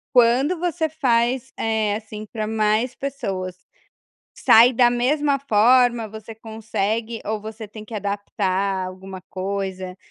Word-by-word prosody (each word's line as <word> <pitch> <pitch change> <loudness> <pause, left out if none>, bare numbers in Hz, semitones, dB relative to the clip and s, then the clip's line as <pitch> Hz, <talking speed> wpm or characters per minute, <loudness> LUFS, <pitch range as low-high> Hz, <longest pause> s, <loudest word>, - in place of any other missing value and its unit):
Quando 255 +8 +4
você 340 -2 0
faz, 255 -3 0
eh, 220 -2 0
assim 215 -1 -9
pra 215 0 -4
mais 220 +3 +1
pessoas. 195 -10 -4 0.8
Sai 240 +3 +7
da 240 0 +5
mesma 280 +4 +1
forma, 240 -1 +4
você 220 +1 -9
consegue 220 0 -3
ou 215 0 -2
você 220 +1 -8
tem 215 +1 -11
que 225 - -9
adaptar 200 -2 -1
alguma 185 0 -9
coisa, 190 -1 -4
220 Hz, 125 wpm, -22 LUFS, 200-245 Hz, 0.8 s, Sai